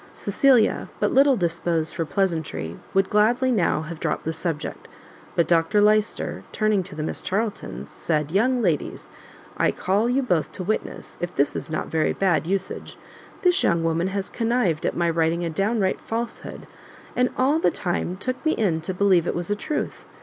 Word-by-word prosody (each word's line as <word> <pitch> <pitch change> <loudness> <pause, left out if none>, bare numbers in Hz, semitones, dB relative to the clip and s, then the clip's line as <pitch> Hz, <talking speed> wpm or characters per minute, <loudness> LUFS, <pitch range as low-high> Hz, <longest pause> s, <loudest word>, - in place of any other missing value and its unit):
Cecilia, 240 +3 +3
but - - +1
little 275 0 +6
disposed 170 -2 -1
for 165 - -2
pleasantry, 160 - -2
would 195 0 +1
gladly 240 +5 +3
now 175 -8 +1
have 160 0 -7
dropt - - -2
the 160 - -1
subject; 160 -2 -4 0.5
but 170 -2 +2
Dr 165 +4 +3
Lyster, 210 +1 +2
turning 215 -2 +2
to 175 - -9
the 155 - -3
Miss - - -3
Charltons, 195 - -3
said, 150 - -2
"Young 240 +6 +2
ladies, 170 -7 -1 0.5
I - - +3
call 205 +5 +1
you 265 +2 +2
both 175 -10 0
to 185 - -5
witness 215 +4 -4
if 175 0 -3
this 140 +1 +2
is - - -4
not 155 - -2
very 160 -1 +1
bad 175 -5 +1
usage: 195 0 -3 0.5
this 360 +1 +4
young 170 -1 +2
woman 165 +2 +1
has 195 0 -2
connived 225 -9 0
at - - -2
my 170 0 +2
writing 165 +1 +1
a 165 - -2
downright 195 +2 0
falsehood, 230 +1 -5 0.5
and 250 0 +3
all 280 +5 +3
the - - +3
time 180 -1 -2
took 255 +5 -4
me 315 - +2
in 170 -7 0
to 180 +3 -4
believe 185 -3 +3
it - - -1
was 175 +3 -3
a - - +2
truth. 295 +8 -4
190 Hz, 180 wpm, -24 LUFS, 165-220 Hz, 0.5 s, little